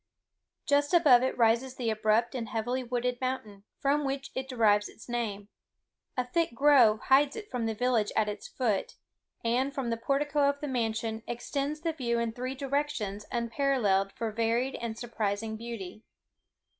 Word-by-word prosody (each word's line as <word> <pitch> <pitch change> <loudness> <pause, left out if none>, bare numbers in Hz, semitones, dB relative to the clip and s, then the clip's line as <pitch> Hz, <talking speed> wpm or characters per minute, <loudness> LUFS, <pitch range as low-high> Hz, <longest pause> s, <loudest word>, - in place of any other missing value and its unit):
Just 290 +4 +2
above 285 -8 +7
it 260 - -1
rises 235 +2 +2
the 235 -3 -1
abrupt 215 +3 +1
and 235 -4 -4
heavily 245 +3 -2
wooded 245 0 -2
mountain, 215 -6 -4
from 290 +1 +1
which 275 0 -3
it 265 0 -4
derives 210 -5 +3
its - - -14
name; 220 -4 -3 0.7
a 250 - +1
thick 325 0 0
grove 255 -6 +5
hides 275 +2 +4
it 420 -1 -8
from 240 -3 -1
the 220 - -2
village 235 -2 +1
at 215 -1 +2
its 210 - -5
foot; 220 -7 -1 0.5
and, 260 +4 +1
from 255 -4 -2
the 230 - 0
portico 280 +4 +1
of 285 0 -2
the 295 - -4
mansion, 225 -3 -1
extend 275 +5 -3 0.2
views 235 -3 0
in 235 -1 -1
three 255 +3 -4
directions 270 -7 -2
unparalleled 235 -5 +1
for 225 -1 -3
varied 230 +4 0
and 230 -1 -5
surprising 220 -2 -2
beauty. 220 -3 -7
240 Hz, 160 wpm, -29 LUFS, 220-270 Hz, 0.7 s, above